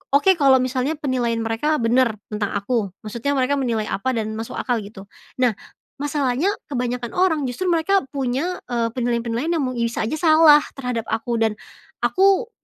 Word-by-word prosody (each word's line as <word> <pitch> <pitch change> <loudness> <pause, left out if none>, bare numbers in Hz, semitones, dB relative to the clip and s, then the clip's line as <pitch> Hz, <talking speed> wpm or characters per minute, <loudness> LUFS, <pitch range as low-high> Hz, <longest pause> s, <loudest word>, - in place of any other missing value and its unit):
oke 380 +7 +5
kalau 270 -2 +6
misalnya 255 +4 -1
penilaian 245 -6 -1
mereka 225 +8 0
bener 235 -1 +3 0.2
tentang 210 -1 -2
aku 205 -1 -1
maksudnya 235 +6 -3
mereka 265 +2 +1
menilai 230 -5 -1
apa 255 +5 -1
dan 220 0 -3
masuk 225 - -6
akal 245 -3 -1
gitu, 200 -1 -10 0.3
nah 250 -2 +2 0.5
masalahnya 290 +3 0 0.2
kebanyakan 245 -3 -3
orang 325 -6 +2
justru 255 +9 -2
mereka 350 +3 +2
punya, 275 +7 -2
eee, 235 -2 -1
penilaian-penilaian 235 +5 -1
yang 320 - 0
mu 255 - -5
bisa 235 0 -1
aja 230 +8 -2
salah 315 -2 +7 0.2
terhadap 250 -4 -3
aku 230 +2 -2
dan, 220 -1 +1 0.5
aku 395 +5 +3
250 Hz, 160 wpm, -22 LUFS, 230-295 Hz, 0.5 s, salah